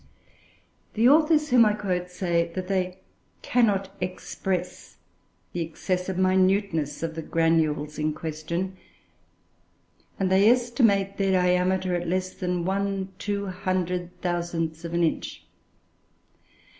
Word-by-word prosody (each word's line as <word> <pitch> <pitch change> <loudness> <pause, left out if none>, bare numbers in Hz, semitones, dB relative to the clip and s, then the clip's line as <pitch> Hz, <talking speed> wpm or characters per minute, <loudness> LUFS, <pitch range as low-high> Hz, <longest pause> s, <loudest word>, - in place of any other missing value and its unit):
The 230 +2 +4
authors 305 +1 +4
whom 245 -2 +7
I 210 -1 +3
quote 180 -4 -2
say 170 -2 0
that 185 -1 -3
they 185 -1 -1 0.4
"cannot 200 -5 +1
express" 180 0 -4 0.6
the 175 - -2
excessive 180 +3 -2
minuteness 185 -4 +1
of 165 -1 -2
the 160 - -5
granules 155 -2 +1
in 155 0 +1
question, 165 +4 -4 1.4
and 190 -1 +1
they 195 +3 +6
estimate 230 -5 +2
their 195 -1 +1
diameter 180 0 +2
at 175 -1 -2
less 185 +1 -1
than 180 -2 -2
1/200000 185 -4 -2
of 170 - -5
an 170 - +2
inch. 160 - -2
185 Hz, 105 wpm, -26 LUFS, 175-195 Hz, 1.4 s, whom